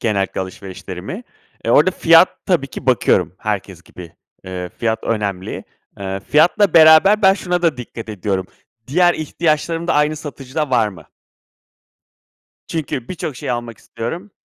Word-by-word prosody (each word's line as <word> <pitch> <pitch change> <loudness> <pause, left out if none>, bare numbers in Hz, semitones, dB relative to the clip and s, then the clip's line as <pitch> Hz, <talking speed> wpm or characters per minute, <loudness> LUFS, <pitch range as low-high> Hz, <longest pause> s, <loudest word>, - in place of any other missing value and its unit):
genellikle 100 -5 -1
alışverişlerimi. 95 - -7 0.4
E, - - 0
orada 185 - +5
fiyat 165 0 +5 0.2
tabii 170 -7 +1
ki 135 - -10
bakıyorum 95 -9 +2
herkes 100 -4 -4
gibi. 85 -2 -12 0.3
Eee, 90 -1 -6
fiyat 110 -1 -1
önemli. 100 -4 -3 0.3
Eee, 95 0 -4
fiyatla 170 - +3
beraber 160 +7 +7
ben 190 0 +6
şuna 180 -2 -2
da 165 -5 +2
dikkat 115 -2 -8
ediyorum, 95 -2 -2 0.4
diğer 175 +6 +3
ihtiyaçlarım 165 +1 -1
da - - +1
aynı 150 +1 +2
satıcıda 145 -1 -5
var 115 -4 +3
mı? 90 -5 -12 1.6
Çünkü 140 -6 -4
birçok 155 -6 -5
şeyi 125 - -3
almak 120 -2 -5
istiyorum. 170 - -6
130 Hz, 135 wpm, -18 LUFS, 100-165 Hz, 1.6 s, beraber